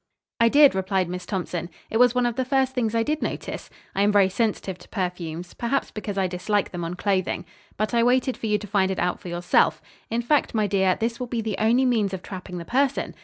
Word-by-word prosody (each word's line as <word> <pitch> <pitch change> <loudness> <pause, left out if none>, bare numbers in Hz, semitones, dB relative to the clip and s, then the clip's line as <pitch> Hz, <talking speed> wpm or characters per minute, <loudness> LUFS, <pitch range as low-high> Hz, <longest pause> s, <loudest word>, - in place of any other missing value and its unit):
"I 230 0 +5
did," 285 +2 +7
replied 190 -1 0
Miss 180 0 -6
Thompson. 175 -3 -3 0.2
"It 225 - +1
was 245 0 +5
one 250 0 +2
of 240 -1 0
the 260 - 0
first 265 0 +1
things 230 -3 -1
I 230 - +3
did 305 +4 -1
notice. - - -4 0.2
I 195 - 0
am 205 +1 +4
very 200 -2 +4
sensitive 195 -3 -1
to - - -16
perfumes; 175 -3 -4
perhaps 250 +3 -1
because 210 -2 -5
I 190 - +2
dislike 185 +3 -1
them 175 -1 -4
on 170 +1 -4
clothing. 185 -1 -1 0.3
But 215 +3 -1
I 235 - +4
waited 250 +2 +2
for 225 - -4
you 210 -1 +2
to 210 - -8
find 195 -2 +1
it 190 - -2
out 180 0 0
for - - -10
yourself. 175 0 +2 0.3
In 235 +1 -1
fact, 285 0 +1
my 215 -1 +2
dear, 190 -2 +2
this 230 +1 -1
will 250 - -3
be 235 -1 -2
the 215 -2 -2
only 235 +4 +3
means 215 -6 +1
of 185 - -9
trapping 185 -1 -7
the 170 - -6
person. 270 +5 0
210 Hz, 240 wpm, -24 LUFS, 185-240 Hz, 0.3 s, did